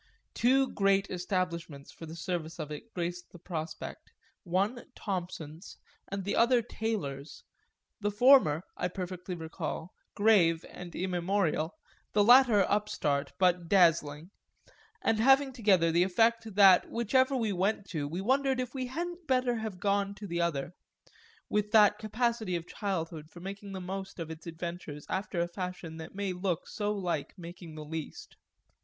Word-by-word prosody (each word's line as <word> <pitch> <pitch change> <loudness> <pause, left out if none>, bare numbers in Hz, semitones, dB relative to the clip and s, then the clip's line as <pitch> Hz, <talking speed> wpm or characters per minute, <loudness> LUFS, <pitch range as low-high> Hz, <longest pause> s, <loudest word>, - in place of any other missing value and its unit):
Two 265 +3 +3
great 195 0 +2
establishments 170 -5 -3
for 165 - -10
the 160 - -8
service 170 -2 -4
of 155 -2 -5
it 150 +10 -8
graced 175 0 -4
the - - -12
prospect, 160 -2 -6 0.3
one 200 +7 -1
Thompson's 175 -3 -5 0.3
and 195 0 -4
the 200 - -1
other 235 0 +4
Taylor's, 160 - -4 0.6
the 205 -1 0
former, 210 - +5
I - - -1
perfectly 180 0 -5
recall, 160 0 -5 0.2
grave 185 -6 +4
and 180 -1 -9
immemorial, 180 -2 0 0.4
the 205 - +4
latter 240 -4 +7
upstart 150 -9 0
but 180 -2 +2
dazzling, 165 -3 +3 0.7
and 220 - +2
having 270 +3 +5
together 195 -8 +3
the 170 +2 +3
effect 225 +3 +2
that 195 -3 +7
whichever 260 +4 +2
we 225 -5 0
went 195 +2 0
to 150 -5 -2
we 170 +6 -4
wondered 265 +4 +2
if 250 -1 -3
we 260 -2 -3
hadn't 345 +5 -5
better 255 -3 +2
have 220 -4 -5
gone 200 0 0
to 210 - -8
the 170 -2 -2
other 160 -2 -1 0.7
with 210 0 0
that 210 -1 +6
capacity 220 -2 -1
of 170 -1 -3
childhood 165 -6 -4
for 175 - -13
making 195 +2 -7
the 190 - -4
most 190 +1 -6
of 165 -2 -5
its 160 +1 -9
adventures 165 -3 -6
after 190 -2 -2
a 170 - 0
fashion 180 -2 -6
that 160 +3 -9
may 200 -2 -2
look 180 -2 -2
so 210 -1 -2
like 180 -5 -3
making 170 -2 -10
the 155 -1 -7
least. 160 0 -7
185 Hz, 155 wpm, -30 LUFS, 170-215 Hz, 0.7 s, latter